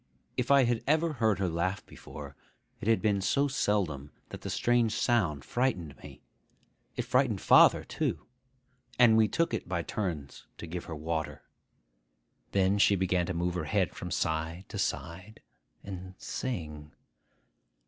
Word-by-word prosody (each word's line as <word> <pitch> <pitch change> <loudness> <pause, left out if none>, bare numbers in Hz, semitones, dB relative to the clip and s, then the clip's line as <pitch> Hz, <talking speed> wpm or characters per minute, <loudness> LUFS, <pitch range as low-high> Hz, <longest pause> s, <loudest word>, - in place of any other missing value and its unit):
If 125 - -2
I 140 -1 +6
had 120 -2 0
ever 160 +2 +2
heard 110 -6 +1
her 95 -1 0
laugh 95 +4 -2
before, 70 -1 -10 0.4
it - - -6
had 115 -1 +3
been 100 -2 +2
so 140 +9 +2
seldom 100 - -1 0.2
that - - -8
the - - -5
strange 120 -2 +2
sound 80 - +1
frightened 95 - -1
me. - - -13 0.7
It - - -2
frightened 125 -5 +1
father - - +6
too; - - -3 0.7
and 120 -3 +6
we 110 -1 +5
took 165 +4 0
it 110 - -3
by 85 -2 -1
turns 80 -10 -5
to - - -7
give 85 +1 -6
her 80 - -6
water. 80 +1 -4 1.1
Then 100 +1 +2
she 100 - +5
began 90 -2 0
to 90 - -3
move 85 +1 -1
her 90 - -3
head 100 -4 0
from 90 - -6
side 80 +2 -2
to - - -5
side, 95 +6 -4 0.4
and 95 -1 -8
sing. 75 - -5
95 Hz, 155 wpm, -30 LUFS, 85-115 Hz, 1.1 s, I